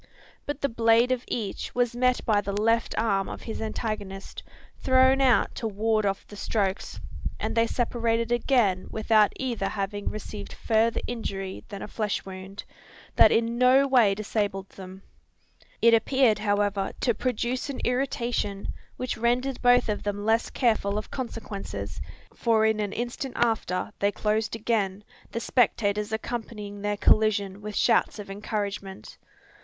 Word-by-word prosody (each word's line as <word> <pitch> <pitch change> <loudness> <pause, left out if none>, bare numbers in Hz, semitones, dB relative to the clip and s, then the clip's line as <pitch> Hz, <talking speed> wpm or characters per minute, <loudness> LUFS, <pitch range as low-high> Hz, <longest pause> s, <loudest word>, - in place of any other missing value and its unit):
But 290 0 -4
the 280 - +2
blade 230 +1 +3
of 255 -1 0
each 215 -5 -4
was 245 -1 +1
met 250 0 +1
by 210 -2 +3
the 200 0 -3
left 230 +2 +1
arm 200 -4 +1
of - - -7
his 225 - -5
antagonist, 215 -3 -4 0.4
thrown 260 +1 +4
out 255 -3 +4
to 230 - -3
ward 215 0 +1
off 195 0 -2
the 205 - -12
strokes 200 -2 -2 0.4
and - - -2
they 230 0 +3
separated 230 -1 0
again 240 -6 +2
without 220 -1 +3
either 235 -7 -2
having 205 0 -3
received 210 -1 -7
further 225 0 +1
injury 195 -5 -5
than 200 -3 -6
a - - -6
flesh 210 -1 -2
wound, 190 +1 -8 0.5
that - - +7
in 230 +1 +1
no 260 +2 +5
way 235 -7 +4
disabled 205 -2 -2
them. 190 0 -11 0.8
It 235 0 +7
appeared, 230 -1 +3
however, 205 -1 0
to 240 - +2
produce 250 +3 -2
an 275 - -4
irritation, 245 -6 -1 0.3
which 255 -1 -3
rendered 245 +3 0
both 245 0 +5
of 210 -1 -1
them 205 0 -3
less 225 +1 +2
careful 220 -5 +1
of 215 - -5
consequences: 225 -6 -5 0.3
for 225 -2 +2
in 220 -1 +2
an 205 -2 -1
instant 245 +3 -4
after 220 -6 0
they 200 0 +2
closed 215 +2 -1
again, 210 -3 -1 0.3
the 230 - -2
spectators 210 -4 +1
accompanying 215 -2 -5
their 205 0 -1
collision 205 -2 +2
with 210 0 -6
shouts 230 +1 +3
of 205 -2 -8
encouragement. 200 -1 -5
220 Hz, 150 wpm, -26 LUFS, 205-240 Hz, 0.8 s, that